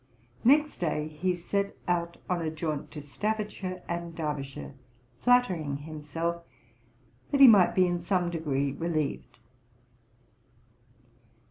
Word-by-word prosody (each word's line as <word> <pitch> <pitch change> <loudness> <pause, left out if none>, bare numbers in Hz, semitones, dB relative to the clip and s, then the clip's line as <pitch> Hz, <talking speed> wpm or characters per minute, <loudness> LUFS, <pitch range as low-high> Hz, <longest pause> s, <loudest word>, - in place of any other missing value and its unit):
Next 295 +5 +4
day 155 -3 -1
he 180 +4 -1
set 200 +3 -2
out 170 -1 0
on 180 -2 0
a 160 - -1
jaunt 155 -2 -3
to 150 - -8
Staffordshire 205 +2 -3
and 170 -1 -4
Derbyshire, 150 -4 -4 0.5
flattering 185 - +2
himself 155 +3 -4 0.9
that 280 - +1
he 275 - +11
might 205 -6 +6
be 185 - +5
in 175 -1 0
some 175 0 0
degree 140 -4 -1
relieved. 155 -5 -3
170 Hz, 115 wpm, -28 LUFS, 150-185 Hz, 0.9 s, he